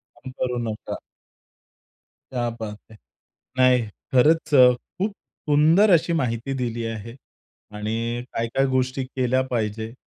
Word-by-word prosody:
काम 130 - -10
करू 125 -1 -1
नका. 110 - -5 1.4
क्या 120 -2 -1
बात 105 -1 -5
है! 110 - -14 0.6
नाही 130 -1 +5 0.3
खरंच 150 +4 +3
अ, 125 -2 +8 0.2
खूप 200 +4 0 0.4
सुंदर 160 +8 +5
अशी 170 0 +3
माहिती 125 -3 -1
दिली 120 -1 -2
आहे 115 +1 -6 0.6
आणि 115 +3 -2
काय-काय 115 +4 0
गोष्टी 130 0 0
केल्या 130 0 0
पाहिजे. 110 -2 -3
125 Hz, 120 wpm, -23 LUFS, 115-135 Hz, 1.4 s, अ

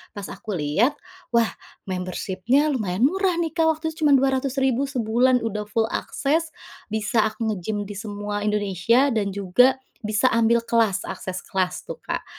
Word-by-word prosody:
pas 205 -1 -5
aku 200 0 -5
lihat 185 - +1 0.4
wah 230 -1 +4 0.3
membership-nya 190 - 0
lumayan 210 -4 -1
murah 370 +4 +2
nih 335 -2 -1
Kak 325 -2 +2
waktu 320 +1 -4
itu 320 -1 -3
cuma 285 - +6
Rp200.000 265 0 +1
sebulan 245 0 +2
udah 210 -1 -3
full 225 +1 +1
akses, 315 +3 -1 0.4
bisa 220 +1 +1
aku 220 +1 -3
nge-gym 205 +1 -2
di 205 - -6
semua 205 0 -4
Indonesia 210 +5 +2
dan 200 -3 0
juga 200 +7 +3 0.2
bisa 215 +4 +2
ambil 230 +1 +4
kelas 230 -4 +1
akses 185 -1 -5
kelas 185 -2 -2
tuh, - - -5
Kak. - - -3
225 Hz, 155 wpm, -23 LUFS, 205-265 Hz, 0.4 s, cuma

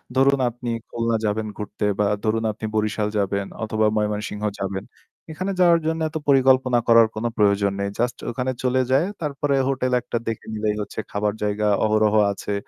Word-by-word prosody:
ধরুন 135 +1 +4
আপনি 120 +1 -7 0.2
খুলনা 115 -1 0
যাবেন 110 +1 -1
ঘুরতে 105 0 -4
বা 105 - +3 0.2
ধরুন 110 +1 0
আপনি 110 +1 -7
বরিশাল 110 0 0
যাবেন 100 0 0 0.2
অথবা 110 0 0
ময়মনসিংহ 105 0 -2 0.2
যাবেন। 95 0 -3 0.5
এখানে 185 +5 -3
যাওয়ার 170 -2 +5
জন্য 160 0 0
এত 155 - -4
পরিকল্পনা 130 -2 +4
করার 115 -1 +7
কোন 110 +2 -3
প্রয়োজন 100 -1 +3
নেই। 100 0 -1
জাস্ট 120 +1 0
ওখানে 125 +2 -2
চলে 130 0 +2
যায় 135 +6 +4 0.2
তারপরে 145 -2 -1
হোটেল 130 -1 0
একটা 120 - -3
দেখে 115 -1 -3
নিলেই 105 -1 -1
হচ্ছে 105 - -6
খাবার 105 0 0
জায়গা 105 0 0 0.2
অহরহ 110 0 +2 0.2
আছে। 100 +1 -4
110 Hz, 170 wpm, -23 LUFS, 105-130 Hz, 0.5 s, করার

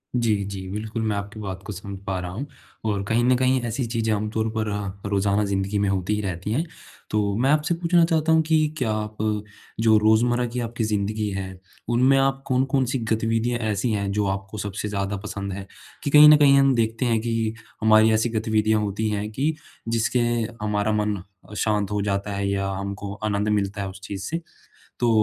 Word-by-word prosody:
जी, 115 -3 +2
जी। 95 -1 -6
बिल्कुल, 110 +2 -4
मैं 110 -2 0
आपकी 100 +2 -6
बात 95 -2 -5
को 105 - -5
समझ 100 +1 -7
पा 95 -1 -1
रहा 90 0 -5
हूँ। 125 +10 -4 0.4
और 100 -2 0
कहीं 120 +2 +2
न 125 0 +4
कहीं 130 0 +2
ऐसी 120 +2 -2
चीज़ें 115 -1 -1
आमतौर 110 +1 -1
पर 110 -1 -1
अ, 100 -1 -4
रोज़ाना 100 +1 +1
ज़िंदगी 100 +1 -1
में 100 - +1
होती 95 +1 0
ही 105 - -2
रहती 95 +1 -4
हैं। 155 +9 0 0.4
तो 100 -2 0
मैं 130 +3 +2
आपसे 150 +2 +2
पूछना 170 0 +3
चाहता 160 -1 +1
हूँ 160 - +5
कि 155 -1 +3
क्या 125 -6 0
आप, 105 0 -3 0.6
जो 110 -1 +5
रोज़मर्रा 120 +3 +3
की 125 +1 -4
आपकी 115 -1 -3
ज़िंदगी 105 0 -1
है, 95 -1 -5 0.3
उनमें 130 +3 +4
आप 135 0 +1
कौन-कौन 135 0 +2
सी 130 +1 -1
गतिविधियाँ 115 +2 +1
ऐसी 110 +4 0
हैं 100 -2 -1
जो 105 0 0
आपको 95 +2 -4
सबसे 105 +1 -4
ज़्यादा 100 0 -2
पसंद 100 -1 -5
है? 95 0 -7 0.4
कि 145 - -1
कहीं 150 +1 +9
न 150 - +9
कहीं 140 -2 +6
हम 135 -1 +5
देखते 115 +2 0
हैं 115 -2 +2
कि 115 -1 -1 0.3
हमारी 110 0 +6
ऐसी 110 +2 +2
गतिविधियाँ 110 -1 +1
होती 105 +1 -1
हैं 105 0 -2
कि 150 +7 0 0.3
जिसके 115 +2 +1 0.4
हमारा 105 0 0
मन 105 -2 0 0.4
शांत 105 -2 0
हो 105 -1 0
जाता 100 0 -1
है 100 0 -1
या 100 0 -1
हमको 100 +1 -5
आनंद 105 0 0
मिलता 100 -1 0
है 95 - -3
उस 95 0 -11
चीज़ 95 +1 -5
से, 165 +1 -2 0.6
तो 120 - +3
110 Hz, 200 wpm, -24 LUFS, 100-120 Hz, 0.6 s, कहीं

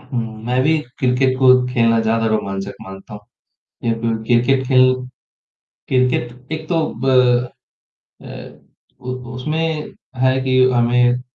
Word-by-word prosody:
हुँ, 115 -4 -6
मैं 125 +1 0
भी 155 +2 +2 0.2
क्रिकेट 130 0 +1
को 130 -1 +5 0.2
खेलना 115 -2 +2
ज़्यादा 115 0 0
रोमांचक 100 -2 -3
मानता 95 +2 -11
हूँ। 105 - -9 0.6
ये 115 -1 +1
ब 115 -1 0
क्रिकेट 130 +3 +2
खेल 130 -1 +5 1.0
क्रिकेट 125 -2 0 0.2
एक 155 0 -5
तो 165 -3 +1 0.2
ब - - -1 1.2
अ, - - -12 0.7
उ 125 0 -5 0.2
उसमें 155 +4 -3 0.3
है 130 0 +3
कि 130 -1 +1
हमें 120 +1 +2
125 Hz, 125 wpm, -18 LUFS, 115-130 Hz, 1.2 s, को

